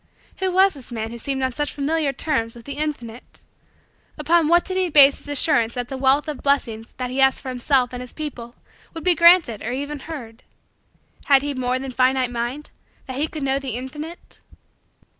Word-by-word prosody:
Who 375 -1 -1
was 380 +2 +4
this 270 -5 -11
man 225 -1 -4
who 235 - -8
seemed 265 +2 -2
on 260 - 0
such 295 +4 -2
familiar 295 +1 0
terms 250 -5 -2
with 235 -1 -13
the 280 - -5
Infinite? 270 -6 -5 0.7
Upon 320 +1 +2
what 345 +2 +4
did 375 - -4
he 375 -1 +1
base 285 -2 +7
his - - -11
assurance 280 -5 +1
that 245 -1 -4
the 270 - -4
wealth 270 +3 +2
of 300 -3 -5
blessings 235 -6 -1
he 255 +1 -2
asked 265 0 +4
for 265 - -7
himself 255 0 +1
and 250 - -5
his 250 - -9
people 245 -6 -7 0.4
would 325 - -6
be 360 - +4
granted 335 - +5
or 230 - -4
even 285 +3 -4
heard? 255 -7 -9 0.8
Had 275 -2 +5
he 290 0 -2
more 255 -1 -1
than 265 0 -6
finite 255 0 +2
mind 245 +5 -4 0.3
that 260 -1 -6
he 300 +3 0
could 310 -2 -6
know 270 0 +1
the 265 -5 -4
Infinite? 300 +7 -8
270 Hz, 195 wpm, -22 LUFS, 250-300 Hz, 0.8 s, base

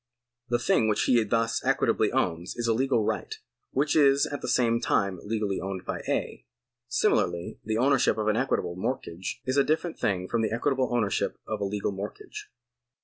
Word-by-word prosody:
The 120 - +2
thing 110 - +2
which 105 - +1
he 120 -3 +4
thus 115 +2 0
equitably - - +2
owns 85 +2 -1
is 120 - -2
a 115 - +3
legal 130 -1 +1
right, - - -2 0.3
which 140 +2 0
is 140 -2 +5
at 145 - -5
the - - -4
same 115 -2 +2
time 100 -6 +1
legally 105 -2 -1
owned 95 -1 -5
by - - -3
A. - - -2 0.4
Similarly 85 -7 0
the 110 0 -1
ownership 130 -3 +3
of 110 -1 -1
an 110 - +3
equitable 110 -8 0
mortgage 95 -4 -4
is 130 +2 0
a 140 - +6
different 160 +3 -1
thing 95 -3 0
from 115 - 0
the 110 - 0
equitable 130 +2 0
ownership 115 -5 0
of 110 -1 -4
a - - +1
legal 100 +1 -2
mortgage. 100 +1 -7
115 Hz, 185 wpm, -27 LUFS, 100-130 Hz, 0.4 s, a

